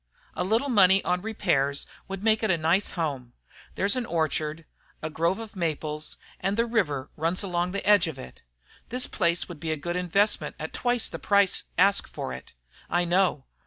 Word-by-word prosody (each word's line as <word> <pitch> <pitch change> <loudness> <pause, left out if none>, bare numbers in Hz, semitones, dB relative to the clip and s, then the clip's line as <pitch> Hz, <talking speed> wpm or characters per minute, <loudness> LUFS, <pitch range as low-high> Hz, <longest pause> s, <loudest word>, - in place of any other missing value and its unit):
A - - -2
little 225 +9 +1
money 195 -4 +5
on 180 0 +1
repairs 140 -10 0 0.2
would 195 0 -6
make 220 -1 +3
it 220 - 0
a 175 - +3
nice 165 +5 +2
home. 140 -7 -3 0.4
There's 200 +4 +2
an 250 -2 -2
orchard, 155 -1 -1 0.4
a 155 - -3
grove 170 +4 0
of 225 -2 -9
maples, 155 -3 -3 0.2
and 195 +2 -1
the 230 - +3
river 160 - -1
runs 165 +5 0
along 175 -2 -1
the 200 - -3
edge 205 -5 +6
of 160 - -5
it. 65 - -11 0.5
This 250 +2 +1
place 170 -3 +1
would 175 -4 -9
be 160 0 -3
a 155 - -1
good 175 +4 -4
investment 180 +4 +1
at - - -6
twice 245 -1 +1
the - - -7
price 200 -2 +3
asked 195 +2 +4
for 65 - -5
it. 65 - -10 0.4
I 175 0 +1
know. 175 -6 +1
180 Hz, 190 wpm, -26 LUFS, 155-200 Hz, 0.5 s, edge